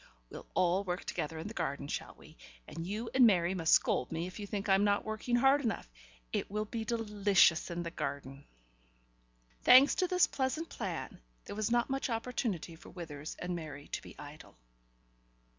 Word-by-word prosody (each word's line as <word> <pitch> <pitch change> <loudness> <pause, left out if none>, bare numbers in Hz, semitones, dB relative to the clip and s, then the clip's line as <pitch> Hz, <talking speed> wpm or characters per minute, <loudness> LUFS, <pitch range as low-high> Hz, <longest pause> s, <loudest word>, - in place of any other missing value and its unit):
We'll - - -9
all 180 +2 +2
work 180 -1 -4
together 160 +2 -3
in 160 - -5
the 215 - -7
garden, 140 -9 -3
shall - - -5
we, - - -16 0.3
and 165 +2 -6
you 220 +4 -4
and 255 -2 +7
Mary 180 -3 +3
must 165 -4 +2
scold 125 - +3
me 165 +1 -2
if 185 +3 -8
you 205 - -5
think 200 0 -4
I'm 195 0 +4
not 205 -1 +2
working 220 +3 -1
hard 270 +3 +4
enough. 225 - -2 0.5
It - - -1
will 210 +1 -2
be 225 +1 -4
delicious 210 -7 +3
in 175 0 -3
the 170 - -5
garden." 140 -3 -5 1.2
Thanks 260 +3 +8
to 365 - +1
this 360 0 +4
pleasant 280 +5 -2
plan, 185 - -5 0.2
there - - -7
was 215 +1 -1
not 240 +2 +1
much 270 0 -1
opportunity 225 - -3
for 160 - -14
Withers 155 -4 -7
and 180 0 -3
Mary 155 -3 -8
to - - -4
be - - -12
idle. 145 - -12
195 Hz, 185 wpm, -32 LUFS, 165-230 Hz, 1.2 s, Thanks